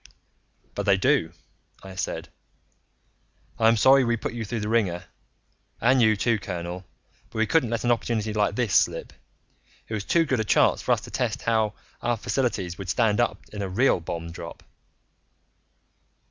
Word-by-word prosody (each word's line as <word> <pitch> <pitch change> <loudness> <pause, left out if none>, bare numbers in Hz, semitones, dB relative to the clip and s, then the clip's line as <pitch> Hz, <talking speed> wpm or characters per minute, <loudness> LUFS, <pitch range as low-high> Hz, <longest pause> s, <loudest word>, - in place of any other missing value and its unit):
"But 100 0 -4
they 100 -1 +5
do," 125 - +2 0.5
I 95 -1 -9
said. 95 - -4 1.3
"I'm 115 0 +5
sorry 135 +4 +6
we 120 -1 +1
put 110 - -4
you 120 -1 -4
through 110 +1 -4
the 105 - -3
wringer 100 -6 +1 0.8
and 125 +2 +4
you 110 -2 +5
too, 115 +2 +1
colonel 90 -1 -5 0.4
but - - -9
we 110 - +3
couldn't 155 -3 +2
let 115 0 -2
an 120 - +2
opportunity 110 -2 -1
like 105 -1 +1
this 120 -6 0
slip. - - +2 0.7
It - - -7
was 105 -2 -2
too 165 +7 +2
good 130 -5 0
a - - +1
chance 105 - +3
for - - -1
us - - +3
to - - -11
test - - -2
how 110 -2 +1 0.3
our 120 -1 0
facilities 100 -8 -2
would 95 -2 -6
stand 105 +3 +2
up 95 - 0
in 105 - -5
a 95 - -3
real 120 +3 +3
bomb 85 0 -5
drop." 85 0 -9
110 Hz, 175 wpm, -25 LUFS, 95-120 Hz, 1.3 s, sorry